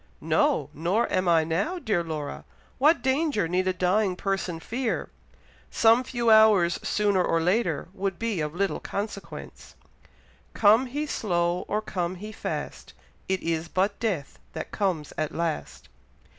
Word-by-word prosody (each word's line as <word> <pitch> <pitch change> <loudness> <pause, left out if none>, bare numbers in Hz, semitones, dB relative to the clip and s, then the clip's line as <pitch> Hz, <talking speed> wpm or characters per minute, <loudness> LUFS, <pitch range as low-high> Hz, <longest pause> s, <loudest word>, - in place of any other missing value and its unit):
"No! - - +1
nor 180 +9 0
am 185 0 +1
I 165 -2 +5
now, 175 - -1
dear 205 - 0
Laura. 155 -3 -5 0.4
What 305 +5 +4
danger 265 - +1
need 180 +2 0
a - - +3
dying 185 +1 +1
person 190 -3 -2
fear? 235 +6 -3 0.6
Some 230 +2 +4
few 240 -2 0
hours 210 -6 +5
sooner 205 -3 +1
or 165 - +1
later 180 -2 0
would 195 -2 -3
be 225 -7 -2
of 150 +1 -3
little 195 +1 0
consequence 200 0 -7 0.8
Come 220 +5 +5
he 290 +5 -3
slow, 175 -9 -1
or 210 +1 -1
come 180 -3 -3
he 210 +4 -8
fast, 220 - -5 0.4
It 190 0 0
is 165 0 -1
but 195 +4 0
death 185 -12 -3
that - - -6
comes 180 -8 -1
at 155 -1 -2
last. 165 -2 -3
195 Hz, 145 wpm, -26 LUFS, 170-220 Hz, 0.8 s, I